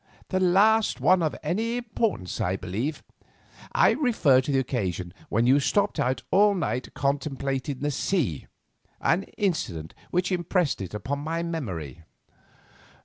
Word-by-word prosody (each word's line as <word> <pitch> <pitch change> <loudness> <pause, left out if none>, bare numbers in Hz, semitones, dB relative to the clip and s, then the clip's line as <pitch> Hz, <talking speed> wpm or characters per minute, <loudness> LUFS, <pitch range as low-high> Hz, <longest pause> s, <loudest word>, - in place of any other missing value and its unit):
"The 185 - +1
last 205 +5 +4
of 170 -4 +3
any 230 +6 -1
importance, 220 - -2
I 90 +2 0
believe. 110 - -3 0.7
I - - +5
refer 195 - +3
to 135 - -3
the 135 - +2
occasion 95 -9 -2 0.2
when 115 +3 +2
you 135 +3 +5
stopped 205 +8 +1
out 130 +1 0
all 205 +1 +5
night 125 - -3
contemplating 140 -1 -2
the 145 0 0
sea; 135 - -1 0.5
an 185 +3 +1
incident 95 - -2 0.2
which 180 +1 0
impressed 175 - 0
it 95 +1 -6
upon 135 +7 -3
my 165 +3 -2
memory." 95 - -5
145 Hz, 135 wpm, -26 LUFS, 120-185 Hz, 0.7 s, I